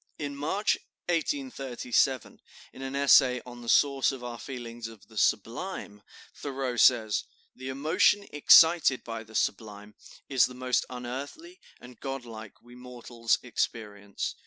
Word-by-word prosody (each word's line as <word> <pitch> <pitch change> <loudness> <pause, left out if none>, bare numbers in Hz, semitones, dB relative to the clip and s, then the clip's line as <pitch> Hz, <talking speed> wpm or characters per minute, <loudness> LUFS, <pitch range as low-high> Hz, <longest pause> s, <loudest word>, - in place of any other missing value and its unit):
In 145 -2 -5
March, 160 +9 0 0.3
1837, 135 - -1 0.3
in - - -11
an 135 0 -5
essay 135 -2 +5
on 120 -1 -10
the 120 - -7
source 140 0 +3
of 130 -2 -8
our 120 -1 -6
feeling 120 -1 -8
of 110 -3 -15
the 110 - -18
sublime, 115 - -2 0.3
Thoreau 135 -3 -4
says: 115 -3 +4 0.3
"The 130 +1 -7
emotion 165 +9 +2
excited 160 -1 +6
by 115 -1 -6
the 110 0 -15
sublime 105 0 -3 0.3
is 130 -3 +3
the 125 - -11
most 125 0 0
unearthly 135 - -7 0.2
and 125 0 -14
god 135 -2 -5
like 110 -3 -11
we 120 0 -16
mortals 120 -2 -2
experience. 105 -4 -4
125 Hz, 135 wpm, -28 LUFS, 115-140 Hz, 0.3 s, excited